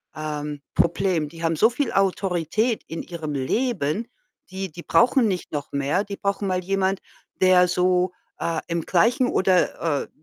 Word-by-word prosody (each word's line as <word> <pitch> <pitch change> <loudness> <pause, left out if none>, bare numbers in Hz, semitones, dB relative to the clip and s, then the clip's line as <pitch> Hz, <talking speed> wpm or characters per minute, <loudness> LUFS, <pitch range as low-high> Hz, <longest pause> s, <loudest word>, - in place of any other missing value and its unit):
ähm, 150 -1 -4
Problem. 170 -2 +1
Die 165 +2 -10
haben 165 0 +1
so 220 +8 +5
viel 245 +1 -2
Autorität 195 +3 0
in 165 - -5
ihrem 160 -4 -5
Leben, 195 - -1 0.4
die 190 -2 -5
die 170 +2 -10
brauchen 250 0 +4
nicht 185 -3 -3
noch 145 -2 -4
mehr. 140 +8 0
Die 200 -1 -6
brauchen 200 0 -1
mal 185 -1 -1
jemand, 195 +1 0 0.4
der 185 -1 +6
so, 180 0 +2 0.3
äh, 165 -1 -1
im 170 0 -1
gleichen 235 +7 +3
oder, 180 - +1
äh, - - -12
180 Hz, 160 wpm, -23 LUFS, 160-195 Hz, 0.4 s, der